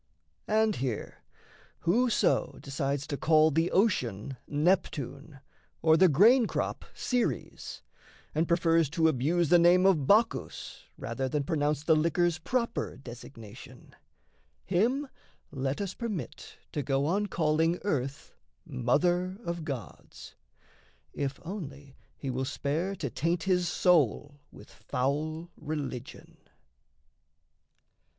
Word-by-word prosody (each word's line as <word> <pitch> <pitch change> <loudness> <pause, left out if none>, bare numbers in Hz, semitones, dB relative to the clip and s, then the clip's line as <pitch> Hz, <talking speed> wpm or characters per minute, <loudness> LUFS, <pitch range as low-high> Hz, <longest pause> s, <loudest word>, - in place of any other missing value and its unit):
And 220 -1 +2
here, 125 -4 -4 0.6
whoso 230 +6 +2
Decides 140 0 -2
to 145 -2 -4
call 155 +1 +4
the 165 +3 +1
ocean 135 - 0
Neptune, 150 -3 -1 0.4
or 160 -1 +6
The 185 +2 +6
grain 220 - +6
crop - - -3
Ceres, 245 -1 -2 0.5
and 160 +2 +1
prefers 165 -3 +3
to 160 +1 +2
abuse 160 +4 +1
The 175 - +6
name 175 +2 +5
of 160 -9 +3
Bacchus 225 +3 +1
rather 135 0 -3
than 145 +2 -1
pronounce 145 0 0
The 160 0 +4
liquor's 170 +1 +1
proper 235 +6 -2
designation, 115 -4 -12 0.7
him 240 +10 +1 0.4
Let 135 0 -2
us 195 -2 -3
permit 205 - -6
to 150 - -2
go 135 +1 0
on 200 +6 +1
calling 165 0 +1
earth 140 -8 -3 0.3
Mother 180 - +1
of 170 -1 -3
Gods, 135 - -8 0.8
if 140 -1 -3
only 145 -7 -7 0.2
he 135 - -4
will 130 +1 -2
spare 155 +8 -2
To 140 -9 -4
taint 165 +7 -1
his 180 -2 +1
soul 145 - +2
with - - -14
foul 155 +6 -3
religion. 145 -5 -6
160 Hz, 115 wpm, -29 LUFS, 140-180 Hz, 0.8 s, or